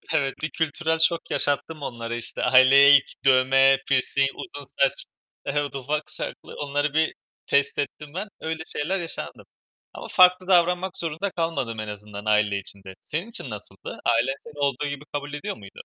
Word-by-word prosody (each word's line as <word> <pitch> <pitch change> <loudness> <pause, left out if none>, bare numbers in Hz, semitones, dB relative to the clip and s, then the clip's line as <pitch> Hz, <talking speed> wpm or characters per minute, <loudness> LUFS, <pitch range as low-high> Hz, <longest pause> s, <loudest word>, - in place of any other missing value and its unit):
Evet, 135 -3 +1
bir 155 - -2
kültürel 160 +1 -1
şok 165 +1 +1
yaşattım 145 +2 0
onlara, 120 -3 -5
işte. 120 0 -1
Aileye 135 +3 +7
ilk, 140 - -8
dövme, 135 +1 +5
pirsing, 135 +1 +4
uzun 145 -5 -8
saç 135 0 0 0.4
Evet, 145 -1 -2
ufak 150 +3 -3
çaplı - - -7
onları 145 0 -1
bir 160 0 +2 0.3
test 140 +1 +2
ettim 145 +1 -5
ben. 200 +3 -3
Öyle 160 0 -4
şeyler 180 +6 -1
yaşandım 165 - -6 0.5
ama - - -8
farklı 185 0 +5
davranmak 180 +1 +2
zorunda 165 +4 -3
kalmadım 140 -10 -2
en 110 - -4
azından 105 0 -8
aile 105 -1 +2
içinde. 95 -1 -7
Senin 170 +9 -3
için 140 - -2
nasıldı? 105 -2 -8
Ailen 120 +3 +2
seni 150 -1 -13
olduğu 140 +1 0
gibi 145 0 -6
kabul 145 0 -4
ediyor 145 - -4
muydu? 100 -2 -13
140 Hz, 165 wpm, -24 LUFS, 130-160 Hz, 0.5 s, Aileye